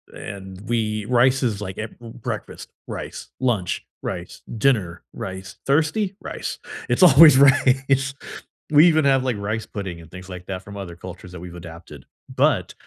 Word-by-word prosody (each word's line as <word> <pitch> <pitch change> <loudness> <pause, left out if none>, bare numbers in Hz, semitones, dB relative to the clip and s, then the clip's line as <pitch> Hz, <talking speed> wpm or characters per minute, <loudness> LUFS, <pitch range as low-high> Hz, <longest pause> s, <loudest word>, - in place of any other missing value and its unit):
and 95 -1 -8
we 110 -2 -1
rice 125 +3 +3
is, 105 -5 -1
like, 95 -2 -6
a 110 - -3
b - - -20
breakfast- 115 0 -7 0.2
rice, - - -7
lunch- 110 -9 -1 0.2
rice, - - -6 0.2
dinner- 105 -9 +1
rice, 95 0 -7
thirsty? 160 +8 +1
Rice. - - -5 0.3
It's - - +3
always 150 -3 +9
rice. 135 -1 +4 0.6
We 150 +3 +7
even 155 -3 +3
have, 135 -2 +4
like, 125 -4 -1
rice 110 +2 -3
pudding 95 -6 -6
and 80 - -16
things 90 +1 -10
like 90 -1 -8
that 95 -1 -4
from 100 +1 -10
other 90 -4 -7
cultures 90 +1 -10
that 90 - -8
we've 90 0 -9
adapted, 85 -4 -11 0.3
but, - - +2
110 Hz, 165 wpm, -22 LUFS, 95-135 Hz, 0.6 s, always